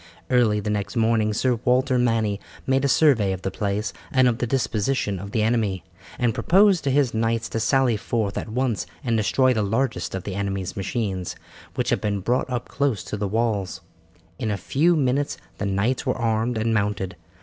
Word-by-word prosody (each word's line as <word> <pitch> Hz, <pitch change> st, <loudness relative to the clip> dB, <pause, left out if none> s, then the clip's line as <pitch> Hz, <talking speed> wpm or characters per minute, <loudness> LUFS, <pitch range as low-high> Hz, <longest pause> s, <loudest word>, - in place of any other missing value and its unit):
Early 115 Hz, -4 st, +3 dB
the 105 Hz, +1 st, -2 dB
next 105 Hz, +2 st, -3 dB
morning 110 Hz, -2 st, +2 dB
Sir 120 Hz, +2 st, +1 dB
Walter 130 Hz, +1 st, +2 dB
Manny 110 Hz, -4 st, +1 dB, 0.3 s
made 135 Hz, 0 st, +2 dB
a -, -, +3 dB
survey 130 Hz, -9 st, +4 dB
of 95 Hz, -, -7 dB
the 95 Hz, -, -2 dB
place 100 Hz, +1 st, -2 dB, 0.2 s
and 130 Hz, -1 st, +4 dB
of 120 Hz, -2 st, 0 dB
the 120 Hz, -, -1 dB
disposition 110 Hz, -4 st, 0 dB
of 100 Hz, +2 st, -7 dB
the 110 Hz, +1 st, 0 dB
enemy, 110 Hz, -6 st, 0 dB, 0.3 s
and 120 Hz, -3 st, +1 dB
proposed 190 Hz, -, +4 dB
to -, -, +2 dB
his 135 Hz, -2 st, +2 dB
knights 115 Hz, +1 st, 0 dB
to 115 Hz, -, -2 dB
sally 125 Hz, 0 st, +2 dB
forth 110 Hz, -2 st, -2 dB
at -, -, -4 dB
once 120 Hz, -2 st, -1 dB, 0.2 s
and 120 Hz, -3 st, 0 dB
destroy 130 Hz, +4 st, +3 dB
the 110 Hz, -, 0 dB
largest 110 Hz, +2 st, -1 dB
of 95 Hz, -, -4 dB
the 100 Hz, -, -5 dB
enemy's 100 Hz, -1 st, -3 dB
machines, 95 Hz, -3 st, -3 dB, 0.4 s
which -, -, -1 dB
had -, -, +1 dB
been 105 Hz, -2 st, -1 dB
brought 120 Hz, +7 st, 0 dB
up 125 Hz, -2 st, -3 dB
close 135 Hz, -9 st, -1 dB
to -, -, -5 dB
the 105 Hz, 0 st, -2 dB
walls. 105 Hz, -2 st, -1 dB, 0.6 s
In 115 Hz, -4 st, -1 dB
a 105 Hz, -, -1 dB
few 155 Hz, -, +2 dB
minutes 140 Hz, -1 st, 0 dB, 0.2 s
the 100 Hz, -, -1 dB
knights 100 Hz, +6 st, 0 dB
were 130 Hz, -, -1 dB
armed 115 Hz, 0 st, 0 dB
and 110 Hz, +1 st, 0 dB
mounted. 100 Hz, -3 st, -1 dB
115 Hz, 195 wpm, -24 LUFS, 100-130 Hz, 0.6 s, survey